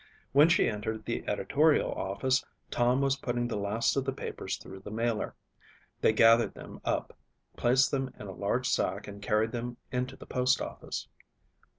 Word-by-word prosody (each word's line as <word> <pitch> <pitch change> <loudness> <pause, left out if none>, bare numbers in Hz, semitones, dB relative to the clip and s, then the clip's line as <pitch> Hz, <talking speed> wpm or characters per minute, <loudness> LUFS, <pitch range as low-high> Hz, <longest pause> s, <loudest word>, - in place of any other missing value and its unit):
When 145 +5 +6
she 170 - +4
entered 110 +1 -3
the 115 - -2
editorial 150 +8 +2
office 130 +8 0 0.3
Tom 125 +2 +2
was 135 0 +2
putting 120 -2 -1
the 120 - -3
last 105 +3 0
of 135 - +1
the 135 - -1
papers - - -4
through 95 - -10
the 100 - -9
mailer. 115 0 -1 0.7
They - - +5
gathered 115 0 +5
them - - -10
up, - - -2 0.4
placed 130 +3 +3
them 135 -2 -1
in - - -8
a 95 - -6
large 105 +7 -1
sack - - 0
and 100 0 -9
carried 105 +2 +1
them 120 0 -4
into 125 +1 -2
the - - -12
postoffice. 125 0 -1
120 Hz, 170 wpm, -30 LUFS, 110-130 Hz, 0.7 s, When